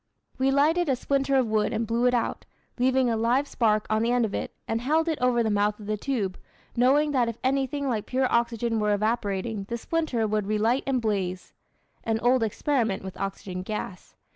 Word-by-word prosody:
We 265 +1 +3
lighted 305 +5 +3
a 265 - +3
splinter 275 +2 0
of 260 -2 +4
wood 215 -1 +1
and 230 - -1
blew 230 +2 +1
it 250 - +3
out, 235 - -2 0.3
leaving 260 0 +3
a 230 - +1
live 240 +6 +1
spark 215 -5 +1
on 215 0 +1
the 235 +1 +1
end 245 -1 +3
of 210 - -5
it, - - -3 0.2
and 225 0 -1
held 315 +6 +1
it 320 -2 -1
over 245 -2 +3
the 220 - 0
mouth 205 +1 +1
of 210 - -10
the 215 +1 -1
tube, 210 -5 -2 0.4
knowing 275 +5 +3
that 250 -4 +2
if 230 - -6
anything 275 +1 0
like 225 -5 -2
pure 260 +1 +1
oxygen 235 -1 +1
were 210 -1 +2
evaporating 210 -1 -1
the 235 +4 -4
splinter 270 -4 -1
would 210 -1 -1
relight 220 +5 +1
and 260 -3 0
blaze 190 -4 -2 0.5
(an 225 -1 0
old 245 +1 +3
experiment 225 -2 0
with 190 -1 -7
oxygen 195 -1 -4
gas). 195 -1 -6
235 Hz, 205 wpm, -26 LUFS, 215-260 Hz, 0.5 s, of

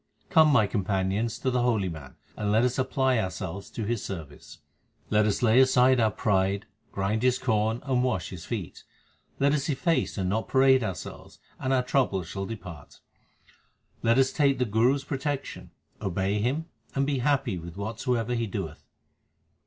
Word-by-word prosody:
Come, 160 -4 +6
my 130 -8 +4
companions, 100 +2 -1
to 130 - -1
the 125 0 +1
holy 115 -6 +1
man, 75 -6 -8 0.2
and 105 -1 -1
let 110 +3 +4
us 125 +2 0
apply 130 -1 +1
ourselves 95 -1 -4
to 110 - -5
his 115 0 -2
service. 80 -7 -8 0.5
Let 105 0 +4
us 105 - -1
lay 115 +1 +5
aside 130 -1 +5
our 110 -2 +4
pride, 100 -1 0 0.3
grind 100 +3 -1
his 125 0 +3
corn, 110 -1 0
and 130 -2 +1
wash 125 -9 -1
his 90 -3 -8
feet. 105 -7 -6 0.5
Let 140 +1 +3
us 140 -1 -1
efface 155 +1 0
and 95 -2 -1
not 110 +4 -1
parade 130 -1 +4
ourselves, 95 -6 -7 0.2
and 130 - -2
our 130 -1 +3
troubles 110 - 0
shall 95 +2 -5
depart. 90 -9 -9 1.0
Let 115 +2 +3
us 135 0 +4
take 140 -3 +3
the 125 - +1
Guru 115 +5 +3
s 140 - -5
protection, 140 0 -4 0.3
obey 100 +1 -1
him, 140 +8 -1 0.3
and 135 0 +2
be 140 -2 0
happy 135 -7 0
with 85 +2 -9
whatsoever 115 +3 -2
he 115 -1 -1
doeth. 100 - -5
115 Hz, 170 wpm, -27 LUFS, 100-130 Hz, 1.0 s, Come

